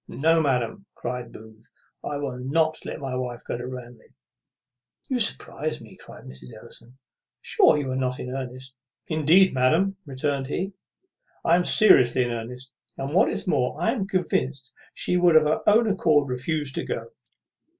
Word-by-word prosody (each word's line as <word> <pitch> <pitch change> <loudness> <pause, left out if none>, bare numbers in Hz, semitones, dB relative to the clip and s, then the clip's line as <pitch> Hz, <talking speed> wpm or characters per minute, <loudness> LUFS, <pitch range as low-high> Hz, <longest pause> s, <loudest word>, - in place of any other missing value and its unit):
"No, 165 +3 +2
madam," 140 - -1
cries 125 -1 -5
Booth, 110 0 -15 0.3
"I 145 - -3
will 135 -3 -5
not 155 +5 0
let - - -6
my 135 -2 -4
wife 125 -1 -5
go - - -4
to 120 +1 -6
Ranelagh." 125 -2 -11 0.9
"You 255 -2 0
surprize 155 -7 +1
me!" 110 -3 -14
cries - - -14
Mrs. 65 -1 -11
Ellison. 125 +3 -13 0.4
"Sure, - - +3
you 140 -3 -3
are - - -2
not 130 -1 -2
in 125 - -6
earnest?" 130 0 -7 0.3
"Indeed, 160 +5 +4
madam," 160 +10 +2
returned 135 0 -2
he, 190 +7 -3 0.7
"I 170 - +5
am 180 - +2
seriously 130 - +5
in 120 - -3
earnest. 125 +3 -6 0.2
And, 135 +2 -4
what 185 - +4
is - - -4
more, 125 -8 0
I 225 - +1
am 215 -6 -3
convinced 140 -8 -2 0.2
she 180 - 0
would 175 -2 +4
of 155 - +7
her 150 +1 0
own 225 +2 +4
accord 155 -8 +2
refuse 140 +3 -2
to - - -3
go." - - -5
135 Hz, 170 wpm, -24 LUFS, 125-165 Hz, 0.9 s, of